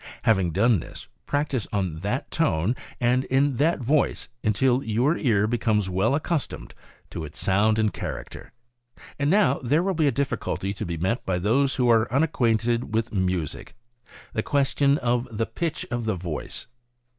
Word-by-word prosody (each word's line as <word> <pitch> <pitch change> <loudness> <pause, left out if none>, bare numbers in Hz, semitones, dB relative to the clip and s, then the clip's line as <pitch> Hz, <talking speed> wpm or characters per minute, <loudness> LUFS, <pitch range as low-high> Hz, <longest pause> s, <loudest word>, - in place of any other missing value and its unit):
Having 95 -5 +3
done 110 +2 +3
this, - - -9 0.2
practice 145 -6 -1
on 95 -6 -2
that 105 - -3
tone 115 - +1 0.2
and 125 +1 +2
in 135 0 +1
that 155 +2 +2
voice 140 +5 +1
until 120 +4 +2
your 120 +8 +1
ear 110 -10 +2
becomes 110 -4 0
well 95 +9 +2
accustomed 155 0 -3 0.4
to 80 - -5
its 75 -1 -9
sound 105 +3 +2
and 110 -2 +1
character. - - -7 0.7
And 140 0 +1
now 165 -8 +3
there 145 +7 +2
will 195 0 0
be 160 -3 +2
a - - +3
difficulty 120 -6 -2
to 100 - -5
be 85 -1 -3
met 95 +9 -1
by 90 -2 -1
those 125 +9 +2
who 125 -2 +1
are 115 -1 +3
unacquainted 120 -5 +1
with 115 0 -1
music 90 -6 -2 0.3
— - - -20
the 110 - 0
question 140 +1 +2
of 120 -1 0
the 115 +1 -1
pitch 165 +3 -3
of 120 -1 -2
the 110 -3 0
voice. 85 -3 -5
120 Hz, 170 wpm, -25 LUFS, 100-140 Hz, 0.7 s, Having